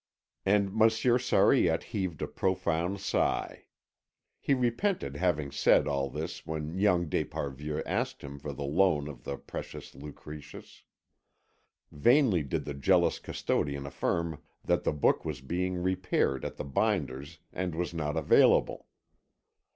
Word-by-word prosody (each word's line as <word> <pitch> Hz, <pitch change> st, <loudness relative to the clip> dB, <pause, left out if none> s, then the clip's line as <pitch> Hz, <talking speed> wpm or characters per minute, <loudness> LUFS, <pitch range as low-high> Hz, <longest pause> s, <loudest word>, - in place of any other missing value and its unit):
And 100 Hz, -1 st, +3 dB
Monsieur 115 Hz, +2 st, +3 dB
Sariette 125 Hz, -, +3 dB
heaved 95 Hz, -6 st, -3 dB
a -, -, -2 dB
profound 95 Hz, 0 st, -1 dB
sigh. 95 Hz, -, -1 dB, 0.7 s
He 140 Hz, -, +2 dB
repented 125 Hz, -, 0 dB
having 75 Hz, -4 st, 0 dB
said -, -, +4 dB
all 70 Hz, -1 st, -1 dB
this -, -, -5 dB
when 80 Hz, 0 st, -4 dB
young 90 Hz, -4 st, +3 dB
d'Esparvieu 75 Hz, +1 st, -3 dB
asked -, -, -2 dB
him 70 Hz, 0 st, -8 dB
for 75 Hz, +1 st, -5 dB
the 70 Hz, +1 st, -6 dB
loan 75 Hz, 0 st, +2 dB
of 70 Hz, -5 st, -10 dB
the 70 Hz, -, -4 dB
precious -, -, -8 dB
Lucretius. 75 Hz, +1 st, -11 dB, 1.1 s
Vainly 120 Hz, -, +4 dB
did 70 Hz, -, -3 dB
the 75 Hz, -, -4 dB
jealous 70 Hz, 0 st, +2 dB
custodian 70 Hz, -1 st, -2 dB
affirm 80 Hz, +3 st, -2 dB, 0.2 s
that -, -, 0 dB
the -, -, +3 dB
book 75 Hz, -1 st, +2 dB
was 75 Hz, -4 st, -4 dB
being 90 Hz, +7 st, -2 dB
repaired 95 Hz, -7 st, 0 dB
at -, -, -5 dB
the -, -, -5 dB
binder's 75 Hz, -3 st, -1 dB, 0.2 s
and 90 Hz, -3 st, -3 dB
was 90 Hz, +1 st, -2 dB
not 75 Hz, -1 st, -2 dB
available. 80 Hz, -, +3 dB
80 Hz, 135 wpm, -30 LUFS, 70-95 Hz, 1.1 s, said